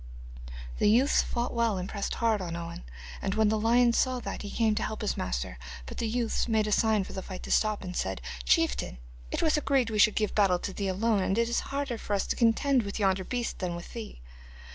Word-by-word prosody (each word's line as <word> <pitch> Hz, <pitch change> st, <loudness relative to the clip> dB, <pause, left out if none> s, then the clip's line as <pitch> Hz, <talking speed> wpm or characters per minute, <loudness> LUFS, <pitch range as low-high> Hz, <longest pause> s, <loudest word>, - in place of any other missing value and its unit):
The -, -, +4 dB
youths 255 Hz, +7 st, +4 dB
fought 240 Hz, 0 st, -2 dB
well 230 Hz, -4 st, +1 dB
and 180 Hz, 0 st, -3 dB
pressed 200 Hz, -1 st, -3 dB
hard 225 Hz, -3 st, +1 dB
on 170 Hz, -2 st, -4 dB
Owen, 170 Hz, -, -6 dB, 0.4 s
and 195 Hz, -, -1 dB
when 220 Hz, -1 st, +3 dB
the 215 Hz, 0 st, +1 dB
lion 235 Hz, +2 st, +4 dB
saw 255 Hz, +1 st, +1 dB
that -, -, -5 dB
he 205 Hz, -, -6 dB
came 220 Hz, 0 st, +1 dB
to 215 Hz, -, -1 dB
help 220 Hz, -, -3 dB
his 210 Hz, -, -1 dB
master. -, -, -3 dB, 0.3 s
But -, -, -8 dB
the 230 Hz, -, 0 dB
youths 235 Hz, +1 st, 0 dB
made 220 Hz, -2 st, +2 dB
a 210 Hz, -, -2 dB
sign 215 Hz, -1 st, +3 dB
for -, -, -9 dB
the 190 Hz, -, -4 dB
fight 185 Hz, -1 st, -8 dB
to -, -, -6 dB
stop, 215 Hz, -2 st, +2 dB
and 180 Hz, -1 st, -6 dB
said: 95 Hz, -, -2 dB, 0.2 s
'Chieftain, -, -, +1 dB, 0.3 s
it -, -, -2 dB
was 310 Hz, -1 st, +3 dB
agreed 270 Hz, -5 st, +1 dB
we 215 Hz, -, -1 dB
should 210 Hz, 0 st, +5 dB
give 215 Hz, -2 st, 0 dB
battle 195 Hz, -4 st, +3 dB
to 195 Hz, -, -5 dB
thee 200 Hz, 0 st, -3 dB
alone, 205 Hz, +2 st, +1 dB
and 190 Hz, +2 st, 0 dB
it 235 Hz, 0 st, +2 dB
is 235 Hz, -, +1 dB
harder 275 Hz, -4 st, -2 dB
for 205 Hz, -, -2 dB
us 195 Hz, -, 0 dB
to -, -, -1 dB
contend 250 Hz, +3 st, +3 dB
with 200 Hz, -2 st, -5 dB
yonder 190 Hz, -2 st, +1 dB
beast 240 Hz, +4 st, -3 dB
than 180 Hz, -2 st, -2 dB
with 175 Hz, -, -9 dB
thee. 225 Hz, -, -8 dB
215 Hz, 240 wpm, -29 LUFS, 190-235 Hz, 0.4 s, should